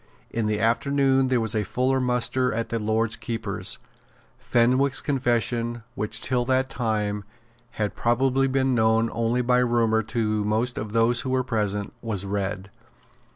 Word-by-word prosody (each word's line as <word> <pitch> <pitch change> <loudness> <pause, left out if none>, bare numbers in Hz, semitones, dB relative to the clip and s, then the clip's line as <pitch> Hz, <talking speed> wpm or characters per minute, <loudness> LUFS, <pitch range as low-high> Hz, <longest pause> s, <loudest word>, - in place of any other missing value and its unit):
In 115 -2 -1
the 105 -1 0
afternoon 135 +3 +2
there 130 -1 +2
was 110 -2 +1
a 110 - 0
fuller 130 +6 0
muster 125 0 0
at 115 +1 -3
the 115 - -1
Lord 110 +1 0
Keeper's. 115 -2 -2 0.6
Fenwick's 130 +3 +2
confession, 120 -3 0
which, 105 +2 -2
till 125 -1 0
that 130 +1 +1
time, 105 -4 -1 0.5
had 105 -1 -2
probably 130 +3 +1
been 130 0 +1
known 115 0 +2
only 115 +2 0
by 125 +1 +3
rumour 115 -2 +2
to 110 -1 -1
most 110 +4 0
of 110 -1 -6
those 115 +1 +3
who 130 - -4
were 130 0 +1
present, 105 -4 -2
was 105 -4 -3
read. 100 0 -3
115 Hz, 155 wpm, -25 LUFS, 110-125 Hz, 0.6 s, by